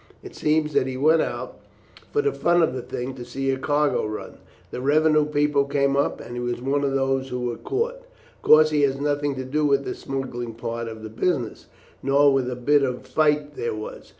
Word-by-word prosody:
It - - -11
seems 155 0 +1
that 130 - +2
he 130 -1 -4
went 155 +4 +4
out, - - -5 0.5
for 435 - +1
the 425 - +2
fun 175 0 +3
of 160 - +1
the 130 - -4
thing, 125 +1 -5
to 125 -2 -8
see 135 +3 -2
a 130 - -2
cargo 145 +1 +1
run. 105 0 -7 0.3
The 125 - -5
revenue 155 +2 +3
people 145 -1 +2
came 140 0 +1
up, 140 - 0
and 120 - -9
he 120 - -4
was 120 0 -2
one 140 +3 0
of 140 -1 0
those 135 0 0
who 125 0 -3
were 120 -1 -2
caught. - - -2 0.4
Of - - -33
course 155 0 +6
he 150 -1 +2
had 135 -1 +1
nothing 145 -1 0
to 130 0 -5
do 150 +4 -1
with 140 -1 +2
the - - -3
smuggling 120 -4 -5
part 115 0 -4
of 110 -1 -8
the 110 - -6
business, 120 +1 -2 0.3
nor 140 +1 +4
with 130 -2 +1
a 125 - -3
bit 145 +4 +3
of 130 -2 0
a - - -12
fight 150 -1 +1
there 120 -3 -3
was. 110 - -8
140 Hz, 230 wpm, -24 LUFS, 125-150 Hz, 0.5 s, course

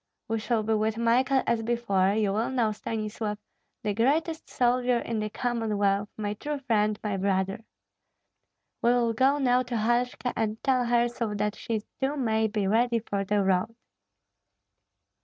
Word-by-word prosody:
We 225 0 -1
shall 225 0 0
be 220 +1 0
with 220 +1 0
Michael 255 +3 +2
as 235 -1 +1
before; 220 -5 +1
you 210 -2 +1
will 220 +3 0
know, 240 -4 +1
Stanislav, 215 0 -4 0.5
the 210 -1 0
greatest 310 +8 0
soldier 245 0 +2
in 230 -1 -3
the 215 0 -2
Commonwealth, 210 -4 0
my 205 -1 -2
true 295 +7 -4
friend, 215 -6 +1
my 205 -2 -1
brother. 195 +1 0 1.2
We 235 - +3
will 235 -2 +2
go 265 +5 +3
now 250 -3 +3
to 245 -1 -3
Halshka, 240 +3 0
and 220 -1 -1
tell 255 -2 +2
her 240 0 +3
so 235 -3 -3
that 210 0 0
she 220 -2 -3 0.2
too 275 +3 0
may 220 -4 +1
be 210 -2 -1
ready 230 +4 +2
for 205 -3 -2
the 205 +1 +1
road." 190 +4 +1
225 Hz, 160 wpm, -27 LUFS, 210-245 Hz, 1.2 s, We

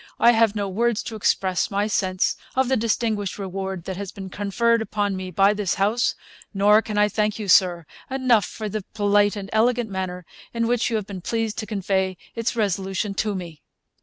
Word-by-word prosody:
I 235 - +7
have 225 -2 +3
no 205 -1 -1
words 230 +3 0
to 225 - -6
express 190 -3 +1
my 200 +1 0
sense 185 -3 0 0.2
of 260 -1 +2
the 265 - +3
distinguished 220 -3 -1
reward 190 -2 -4
that 190 0 -5
has 200 -1 -5
been 195 -2 -8
conferred 230 +4 +1
upon 205 -2 -1
me 185 0 -5
by 195 +3 +4
this 205 -3 -1
House; 210 +5 +1 0.4
nor 210 +2 +5
can 215 -2 -5
I 210 0 +5
thank 210 0 0
you, 215 -2 -5
Sir, 180 -3 +4 0.2
enough 255 -6 +3
for 215 - -6
the 215 +1 -3
polite 205 0 +3
and 200 -2 -6
elegant 230 0 +2
manner 180 -2 -4 0.3
in 230 0 +1
which 240 +1 +1
you 230 - -1
have 215 -2 -1
been 190 -2 -7
pleased 225 +2 -2
to 215 - -5
convey 190 -2 -1 0.2
its 230 +1 -2
resolution 195 -1 -1
to 210 +1 -1
me.' 170 -5 -7
205 Hz, 195 wpm, -23 LUFS, 190-225 Hz, 0.4 s, I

